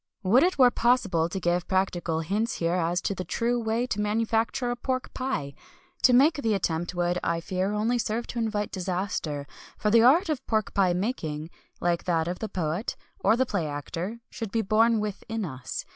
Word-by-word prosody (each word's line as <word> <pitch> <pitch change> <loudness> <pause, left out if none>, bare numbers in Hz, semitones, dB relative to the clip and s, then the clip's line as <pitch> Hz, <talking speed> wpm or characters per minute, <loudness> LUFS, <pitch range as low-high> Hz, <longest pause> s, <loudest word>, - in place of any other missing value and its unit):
Would 215 +8 +5
it 365 0 +2
were 250 -2 +7
possible 210 -11 +2
to 190 - -3
give 175 -1 0
practical 175 -4 0
hints 210 +8 -1
here 170 0 0
as 175 0 0
to 200 - -1
the 185 - -4
true 235 +7 0
way 225 +1 0
to 210 -4 -2
manufacture 225 +3 0
a - - -1
pork 255 +1 -3
pie! 155 - -3 0.5
To 255 - +6
make 285 +5 +5
the 225 -4 +1
attempt 175 -2 -2
would, 175 0 0
I 170 0 0
fear, 185 +3 -2
only 225 +4 +1
serve 230 +1 -1
to 240 - -3
invite 210 -2 -1
disaster; 180 -6 -3 0.3
for 210 - 0
the 230 +1 +6
art 295 - +5
of 305 -5 -2
pork 215 -2 0
pie 185 -3 +3
making, 170 - -3 0.3
like 170 -1 0
that 165 -2 +1
of 180 +1 -3
the 220 - -4
poet, 175 +3 -2 0.2
or 210 +3 +4
the 260 - +3
play 190 -9 -1
actor, 170 +9 -5
should 225 -4 -5
be 225 +1 0
born 225 +2 +3
within 210 +1 -3
us. 130 - -6
205 Hz, 195 wpm, -27 LUFS, 175-230 Hz, 0.5 s, were